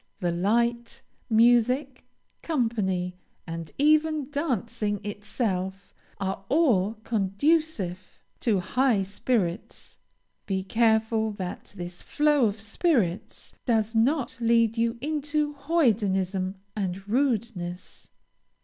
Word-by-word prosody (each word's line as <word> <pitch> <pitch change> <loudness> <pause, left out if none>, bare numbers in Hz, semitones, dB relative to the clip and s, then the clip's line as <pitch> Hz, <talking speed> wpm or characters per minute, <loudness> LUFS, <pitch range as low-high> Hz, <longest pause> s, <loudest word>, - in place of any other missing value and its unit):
The 175 -1 0
light, 235 +6 0 0.3
music, 245 +4 +3 0.4
company, 200 - -1 0.3
and 165 -1 -6
even 305 -1 +3
dancing 230 - -1
itself, 200 -2 -3 0.3
are 195 0 -3
all 230 - +3
conducive 205 - 0 0.2
to 210 -6 +1
high 230 +2 +2
spirits; 200 -1 -3 0.5
be 190 -1 -1
careful 220 +1 +2
that 185 -1 -6
this 175 0 -6
flow 295 -4 +3
of 205 +1 -4
spirits 220 - -1
does 225 -2 +2
not 255 +2 +1
lead 230 -1 +3
you 230 0 0
into 300 0 -1
hoydenism 205 - +1 0.2
and 195 -1 -3
rudeness. 215 -8 -2
225 Hz, 95 wpm, -26 LUFS, 190-260 Hz, 0.5 s, music